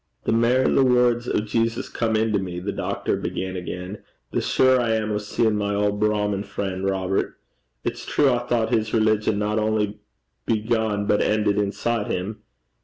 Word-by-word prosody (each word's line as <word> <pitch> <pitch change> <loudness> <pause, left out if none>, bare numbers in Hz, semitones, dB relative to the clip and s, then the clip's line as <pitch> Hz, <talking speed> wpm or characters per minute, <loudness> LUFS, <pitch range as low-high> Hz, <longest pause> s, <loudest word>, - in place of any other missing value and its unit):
'The - - 0
mair 120 +3 +3
the 135 - +4
words 125 -1 +3
o' - - +1
Jesus 115 +2 -1
come 110 -2 -1
into 110 -1 +2
me,' 90 -2 -4
the 90 - -3
doctor - - -2
began 95 0 -4
again, 90 +2 -6 0.3
'the - - 0
surer 130 0 +3
I 115 -2 +1
am 110 -1 -1
o' 105 - 0
seein' 105 +1 0
my 100 -1 -1
auld 105 0 0
Brahmin 105 -2 +1
frien', 95 -2 -4
Robert. 95 0 -1 0.5
It's - - -3
true 140 -2 +2
I 120 - +1
thought 120 -1 0
his 110 -1 +1
religion 110 -1 +2
not 105 +1 0
only 105 -1 0 0.5
began 110 -2 0
but 105 0 +2
ended 105 -1 +2
inside 105 +2 -1
him. 95 +4 -3
105 Hz, 175 wpm, -23 LUFS, 100-115 Hz, 0.5 s, the